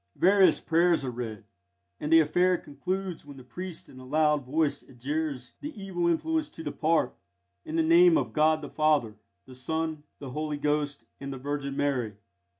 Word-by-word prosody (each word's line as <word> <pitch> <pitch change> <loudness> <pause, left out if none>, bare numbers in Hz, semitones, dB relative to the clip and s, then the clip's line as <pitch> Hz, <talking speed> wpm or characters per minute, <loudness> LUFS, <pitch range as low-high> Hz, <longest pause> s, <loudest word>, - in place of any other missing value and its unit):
Various 190 -2 +5
prayers 170 -2 +2
are 125 - -2
read, 115 -4 -6 0.6
and 150 - -3
the 165 0 +8
affair 180 +4 +2
concludes 180 +6 -4
when 145 -1 -12
the 130 - -11
priest 175 +7 -7
in 130 - -13
a - - -11
loud 150 +2 +2
voice 150 +3 0
adjures 135 0 -4
the 295 -5 -7
evil 180 -3 -1
influence 315 - 0
to 160 - -6
depart, 155 +2 0 0.5
in 160 - -5
the 165 - +3
name 170 +1 +6
of - - -2
God 155 +1 +3
the - - -6
Father, 150 -8 +2 0.3
the 130 - -13
Son, 160 +4 -3 0.2
the 135 -3 -8
Holy 150 +1 -3
Ghost, 145 0 -1
and 140 0 -6
the 135 - -5
Virgin 140 +1 -4
Mary. 125 -7 0
150 Hz, 175 wpm, -28 LUFS, 140-165 Hz, 0.6 s, the